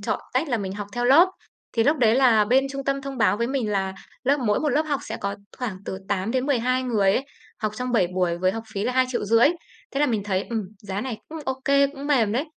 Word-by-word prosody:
chọn 205 Hz, -, -2 dB
tách 270 Hz, +5 st, 0 dB
là 240 Hz, -3 st, 0 dB
mình 190 Hz, -2 st, -4 dB
học 205 Hz, 0 st, -5 dB
theo 245 Hz, +2 st, -2 dB
lớp. 300 Hz, +9 st, +7 dB, 0.4 s
Thì 230 Hz, -, +2 dB
lúc 295 Hz, +5 st, +3 dB
đấy 225 Hz, -3 st, +4 dB
là 240 Hz, -5 st, +5 dB
bên 255 Hz, +5 st, +3 dB
trung 275 Hz, 0 st, -5 dB
tâm 275 Hz, 0 st, -1 dB
thông 275 Hz, -1 st, -6 dB
báo 220 Hz, -2 st, +3 dB
với 235 Hz, +2 st, 0 dB
mình 255 Hz, -4 st, -1 dB
là 190 Hz, -1 st, -1 dB, 0.3 s
lớp 275 Hz, +3 st, +3 dB
mỗi 210 Hz, -4 st, +1 dB
một 310 Hz, -, 0 dB
lớp 290 Hz, +3 st, +2 dB
học 295 Hz, -3 st, -2 dB
sẽ -, -, -5 dB
có 200 Hz, 0 st, -2 dB, 0.2 s
khoảng 225 Hz, -7 st, -3 dB
từ 190 Hz, -, -5 dB
8 200 Hz, +2 st, -1 dB
đến 255 Hz, +1 st, 0 dB
12 255 Hz, -2 st, +1 dB
người 210 Hz, -6 st, +2 dB
ấy, 270 Hz, +5 st, -1 dB, 0.4 s
học 215 Hz, -, 0 dB
trong 250 Hz, 0 st, -3 dB
7 215 Hz, -7 st, +3 dB
buổi 175 Hz, -2 st, 0 dB
với 185 Hz, +1 st, +2 dB
học 225 Hz, -, -5 dB
phí 200 Hz, +1 st, -2 dB
là 250 Hz, -, 0 dB
2.500.000 245 Hz, -2 st, +3 dB, 0.4 s
thế 275 Hz, -, -2 dB
là 295 Hz, -, +4 dB
mình 220 Hz, -6 st, 0 dB
thấy, 190 Hz, -2 st, -1 dB
ừm, 225 Hz, -2 st, -1 dB, 0.2 s
giá 200 Hz, -1 st, -4 dB
này 250 Hz, -3 st, -4 dB
cũng 320 Hz, -, -7 dB
ô 265 Hz, 0 st, -3 dB
kê, 280 Hz, 0 st, +4 dB
cũng 280 Hz, 0 st, -8 dB
mềm 240 Hz, -8 st, +2 dB
đấy. 260 Hz, +7 st, 0 dB
245 Hz, 260 wpm, -24 LUFS, 205-270 Hz, 0.4 s, lớp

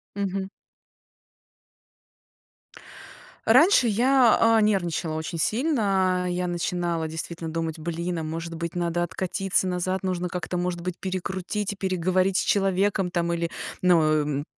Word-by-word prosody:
Мгм. 195 Hz, -1 st, -2 dB, 3.0 s
Раньше 340 Hz, -, +6 dB
я, 245 Hz, +2 st, +4 dB
а, 225 Hz, -1 st, +5 dB
нервничала 175 Hz, -6 st, 0 dB
очень 160 Hz, +2 st, -4 dB
сильно. 195 Hz, -, +1 dB
Я 180 Hz, 0 st, -1 dB
начинала 175 Hz, -1 st, -2 dB
действительно 160 Hz, +1 st, -6 dB
думать: 165 Hz, 0 st, -3 dB
"Блин, 170 Hz, +1 st, -3 dB
а 160 Hz, -, -4 dB
может 165 Hz, +2 st, -5 dB
быть 170 Hz, +1 st, -5 dB
надо 175 Hz, 0 st, -1 dB
откатиться 185 Hz, +2 st, -1 dB
назад. 185 Hz, +1 st, -2 dB
Нужно 180 Hz, -1 st, -2 dB
как-то 180 Hz, 0 st, -4 dB
может 175 Hz, -1 st, -2 dB
быть 180 Hz, 0 st, -4 dB
перекрутить 190 Hz, +2 st, -3 dB
и -, -, -11 dB
переговорить 185 Hz, 0 st, +1 dB
с -, -, +2 dB
человеком, 195 Hz, -1 st, +1 dB
там". 170 Hz, -1 st, -1 dB
Или 170 Hz, 0 st, -1 dB, 0.3 s
ну, 180 Hz, -2 st, +5 dB
м, 150 Hz, -2 st, +1 dB
180 Hz, 125 wpm, -25 LUFS, 170-195 Hz, 3.0 s, Раньше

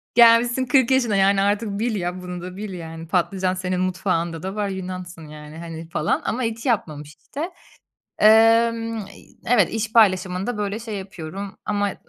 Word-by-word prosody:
Gelmişsin 235 Hz, +2 st, +5 dB
40 260 Hz, 0 st, +3 dB
yaşına, 245 Hz, -5 st, +2 dB
yani, 195 Hz, 0 st, +3 dB
artık 205 Hz, 0 st, 0 dB
bil 230 Hz, 0 st, 0 dB
ya, 180 Hz, -1 st, -3 dB
bunu 180 Hz, -1 st, -6 dB
da 180 Hz, +1 st, -8 dB
bil 205 Hz, -1 st, -6 dB
yani. 165 Hz, -1 st, -8 dB
Patlıcan 185 Hz, +2 st, 0 dB
senin 185 Hz, 0 st, -2 dB
mutfağında 175 Hz, -3 st, -1 dB
da 190 Hz, +1 st, -4 dB
var, 205 Hz, -1 st, -1 dB
Yunansın, 185 Hz, -3 st, -7 dB
yani, 150 Hz, +1 st, -11 dB
hani, 165 Hz, -1 st, -8 dB
falan 155 Hz, -1 st, 0 dB
ama 255 Hz, +3 st, -1 dB
hiç 225 Hz, +1 st, -3 dB
yapmamış 150 Hz, -, -2 dB
işte. 320 Hz, +6 st, -6 dB, 0.7 s
Emm, 225 Hz, +1 st, +4 dB
eee, 200 Hz, -2 st, -9 dB, 0.2 s
evet, 220 Hz, -7 st, +4 dB
iş 225 Hz, 0 st, -3 dB
paylaşımında 190 Hz, 0 st, +2 dB
böyle 205 Hz, +1 st, -2 dB
şey 225 Hz, -2 st, -6 dB
yapıyorum 195 Hz, 0 st, -7 dB
ama, 205 Hz, -1 st, 0 dB
aaa, -, -, -5 dB
195 Hz, 170 wpm, -22 LUFS, 180-225 Hz, 0.7 s, Gelmişsin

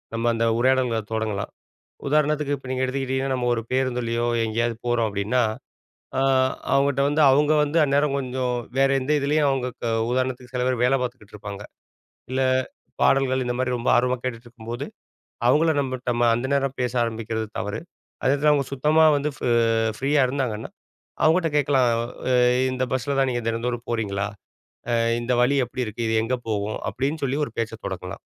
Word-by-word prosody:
நம்ம 115 Hz, +1 st, -2 dB
அந்த 115 Hz, 0 st, +1 dB
உரையாடல்கள 125 Hz, -3 st, +2 dB
தொடங்கலாம். 110 Hz, -3 st, -2 dB, 0.6 s
உதாரணத்துக்கு 150 Hz, 0 st, +1 dB
இப்போ 130 Hz, -, -13 dB
நீங்க 130 Hz, 0 st, -1 dB
எடுத்துக்கிட்டீங்கன்னா, 130 Hz, 0 st, -1 dB
நம்ம 125 Hz, -1 st, -1 dB
ஒரு 115 Hz, -, -2 dB
பேருந்துலயோ 120 Hz, -2 st, 0 dB, 0.2 s
எங்கேயாவது 115 Hz, +1 st, -1 dB
போறோம் 120 Hz, -2 st, +1 dB
அப்டின்னா, 105 Hz, +5 st, 0 dB, 0.8 s
அ -, -, +1 dB, 0.5 s
அவங்ககிட்ட 140 Hz, 0 st, +2 dB
வந்து 150 Hz, +1 st, +1 dB
அவங்க 150 Hz, +3 st, +3 dB
வந்து 150 Hz, +3 st, -1 dB
அந்நேரம் 140 Hz, 0 st, +1 dB
கொஞ்சம் 125 Hz, -1 st, -2 dB, 0.3 s
வேற 135 Hz, -, +4 dB
எந்த 135 Hz, -, -2 dB
இதிலேயும், 145 Hz, +1 st, +2 dB
அவங்க 130 Hz, -2 st, 0 dB, 0.2 s
க 120 Hz, -, 0 dB, 0.2 s
உதாரணத்துக்கு 130 Hz, 0 st, -2 dB
சில 125 Hz, -, 0 dB
பேரு 125 Hz, -2 st, 0 dB
வேலை 125 Hz, +2 st, +4 dB
பார்த்துக்கிட்டுருப்பாங்க. 105 Hz, -5 st, -7 dB, 0.7 s
இல்ல, 130 Hz, +1 st, -1 dB, 0.6 s
பாடல்கள் 130 Hz, -1 st, +3 dB
இந்த 120 Hz, 0 st, -2 dB
மாரி 130 Hz, -1 st, 0 dB
ரொம்ப 120 Hz, -, -3 dB
ஆர்வமா 125 Hz, +1 st, +1 dB
கேட்டுகிட்டுருக்கும்போது, 120 Hz, -1 st, -6 dB, 0.6 s
அவுங்கள 160 Hz, +5 st, +4 dB
நம்பட் 130 Hz, -2 st, -4 dB
நம்ம 120 Hz, 0 st, +1 dB
அந்த 120 Hz, +3 st, -2 dB
நேரம் 135 Hz, -1 st, 0 dB
பேச 125 Hz, -1 st, 0 dB
ஆரம்பிக்கிறது 110 Hz, -1 st, -3 dB
தவறு. 105 Hz, +2 st, -3 dB, 0.4 s
அதேநேரத்துல 145 Hz, +3 st, +3 dB
அவுங்க 140 Hz, -2 st, +1 dB
சுத்தமா 150 Hz, +4 st, +3 dB
வந்து 145 Hz, +1 st, -1 dB
ஃப் -, -, -14 dB, 0.6 s
ஃப்ரீயா 140 Hz, +2 st, +2 dB
இருந்தாங்கன்னா, 125 Hz, -5 st, -3 dB, 0.5 s
அவுங்கட்ட 165 Hz, +1 st, +3 dB
கேட்கலாம். 135 Hz, -3 st, +3 dB, 0.4 s
அ -, -, +3 dB, 0.4 s
இந்த 130 Hz, 0 st, -1 dB
பஸ்ல 135 Hz, +2 st, -1 dB
தான் 135 Hz, -, +2 dB
நீங்க 120 Hz, -1 st, -2 dB
தினந்தோறும் 120 Hz, +1 st, -2 dB
போறீங்களா? 100 Hz, -3 st, -1 dB, 0.6 s
அ 120 Hz, -, +3 dB, 0.3 s
இந்த 125 Hz, +1 st, -1 dB
வழி 140 Hz, +3 st, +3 dB
எப்டி 125 Hz, +1 st, -3 dB
இருக்கு? 115 Hz, +2 st, -4 dB
இது 110 Hz, -, +1 dB
எங்க 125 Hz, +3 st, 0 dB
போகும்? 105 Hz, 0 st, -2 dB
அப்டின்னு 140 Hz, +8 st, -2 dB
சொல்லி 135 Hz, +1 st, -1 dB
ஒரு -, -, -8 dB
பேச்சைத் 115 Hz, -1 st, -4 dB
தொடங்கலாம். 90 Hz, -1 st, -6 dB
125 Hz, 160 wpm, -24 LUFS, 115-135 Hz, 0.8 s, வேற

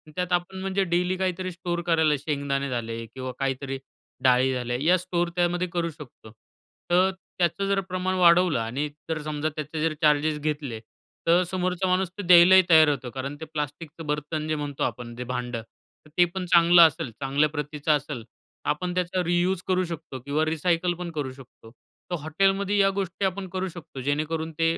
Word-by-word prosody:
त्यात 180 Hz, 0 st, -2 dB
आपण 175 Hz, +2 st, -1 dB
म्हणजे 195 Hz, +1 st, 0 dB
डेली 180 Hz, +1 st, 0 dB
काहीतरी 185 Hz, 0 st, -2 dB
स्टोअर 175 Hz, 0 st, -3 dB
करायला 160 Hz, -3 st, +3 dB
शेंगदाणे 140 Hz, -1 st, -2 dB
झाले 115 Hz, -2 st, -4 dB
किंवा 130 Hz, +2 st, -7 dB
काहीतरी 135 Hz, 0 st, -2 dB, 0.5 s
डाळी 130 Hz, +1 st, +4 dB
झाले 125 Hz, -1 st, -2 dB
या 180 Hz, +3 st, +5 dB
स्टोअर 175 Hz, -1 st, -1 dB
त्यामध्ये 175 Hz, 0 st, +1 dB
करू 170 Hz, -1 st, 0 dB
शकतो. 145 Hz, -8 st, -13 dB, 0.6 s
तर 185 Hz, +2 st, +5 dB, 0.3 s
त्याचं 175 Hz, +3 st, +1 dB
जर 200 Hz, 0 st, +2 dB
प्रमाण 185 Hz, +1 st, -1 dB
वाढवलं 175 Hz, -4 st, +5 dB
आणि 125 Hz, +6 st, -2 dB, 0.2 s
जर 160 Hz, -1 st, -2 dB
समजा, 150 Hz, 0 st, -2 dB
त्याचे 155 Hz, +1 st, -4 dB
जर 160 Hz, -1 st, +1 dB
चार्जेस 150 Hz, 0 st, +3 dB
घेतले, 145 Hz, -6 st, -3 dB, 0.5 s
तर 175 Hz, +2 st, +5 dB
समोरचा 185 Hz, 0 st, -1 dB
माणूस 185 Hz, 0 st, +1 dB
तो -, -, -3 dB
द्यायलाही 180 Hz, +1 st, +8 dB
तयार 160 Hz, -2 st, +7 dB
होतो 135 Hz, -4 st, -2 dB
कारण 135 Hz, +3 st, -5 dB
ते -, -, -4 dB
प्लास्टिकचं 150 Hz, +2 st, -5 dB
बर्तन 150 Hz, +1 st, -2 dB
जे 155 Hz, -, 0 dB
म्हणतो 145 Hz, -2 st, -3 dB
आपण, 120 Hz, -1 st, -4 dB
जे 125 Hz, -, -5 dB
भांडं, 125 Hz, -1 st, -4 dB
तर 115 Hz, +6 st, -25 dB
ते 175 Hz, -, +7 dB
पण 185 Hz, -1 st, -2 dB
चांगलं 170 Hz, +1 st, +7 dB
असेल, 160 Hz, -4 st, -5 dB
चांगल्या 140 Hz, +3 st, +2 dB
प्रतीचं 150 Hz, 0 st, -2 dB
असेल. 145 Hz, -5 st, -7 dB, 0.4 s
आपण 180 Hz, +4 st, -1 dB
त्याचा 180 Hz, 0 st, 0 dB
रियुज 175 Hz, +1 st, +1 dB
करू 185 Hz, 0 st, +2 dB
शकतो 160 Hz, -5 st, -7 dB
किंवा 150 Hz, +2 st, +1 dB
रिसायकल 165 Hz, +2 st, +1 dB
पण 175 Hz, -1 st, -5 dB
करू 145 Hz, -5 st, -3 dB
शकतो. 130 Hz, -4 st, -15 dB, 0.4 s
तर -, -, +1 dB
हॉटेलमध्ये 195 Hz, +6 st, +1 dB
या 195 Hz, -1 st, +5 dB
गोष्टी 195 Hz, 0 st, -2 dB
आपण 190 Hz, 0 st, -2 dB
करू 190 Hz, 0 st, -1 dB
शकतो, 165 Hz, -6 st, -9 dB
जेणेकरून 155 Hz, +4 st, -1 dB
ते 165 Hz, 0 st, +2 dB
160 Hz, 175 wpm, -26 LUFS, 145-180 Hz, 0.6 s, द्यायलाही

